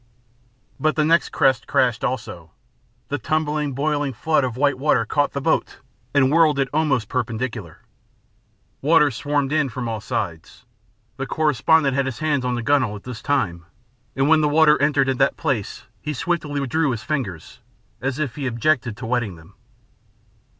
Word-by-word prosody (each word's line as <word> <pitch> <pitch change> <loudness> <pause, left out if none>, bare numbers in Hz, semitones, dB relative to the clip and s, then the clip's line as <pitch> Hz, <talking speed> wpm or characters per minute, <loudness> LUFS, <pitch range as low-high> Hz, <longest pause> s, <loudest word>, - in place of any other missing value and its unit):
But 155 0 +1
the 155 - +2
next 165 +2 +3
crest 135 -2 +1
crashed 125 -3 +1
also. 110 -9 -4 0.6
The 145 - -2
tumbling, 150 +1 -1
boiling 145 0 -1
flood 155 +5 +1
of 125 -2 -3
white 140 -1 +1
water 135 -5 +2
caught 145 +5 0
the 140 - -3
boat - - 0 0.3
and 135 -1 +3
whirled 155 -2 +4
it 135 -1 0
almost 145 -8 +1
perpendicular. 115 - -4 1.0
Water 150 0 +4
swarmed 145 +3 -1
in 155 -3 +2
from 120 +1 -5
all 110 -1 -3
sides. 85 -6 -5 0.5
The 135 - -4
correspondent 150 -1 +2
had 140 -1 +1
his 130 - -4
hands 150 -4 0
on 125 0 -1
the 120 - -3
gunwale 130 -5 +2
at 100 - -10
this 125 -3 -7
time, 85 -12 -1 0.5
and 135 +1 +1
when 160 0 +5
the 150 - +2
water 150 0 +4
entered 145 -2 +3
at 130 -2 -1
that 135 0 +2
place 130 -11 -2 0.2
he 150 - -3
swiftly 155 -1 -2
withdrew 145 +3 0
his 115 -4 -3
fingers, 115 - -4 0.4
as 135 0 -2
if 150 -5 -3
he 140 -2 -2
objected 120 -1 0
to - - -7
wetting 115 -5 -1
them. 80 +4 -17
135 Hz, 170 wpm, -22 LUFS, 120-150 Hz, 1.0 s, when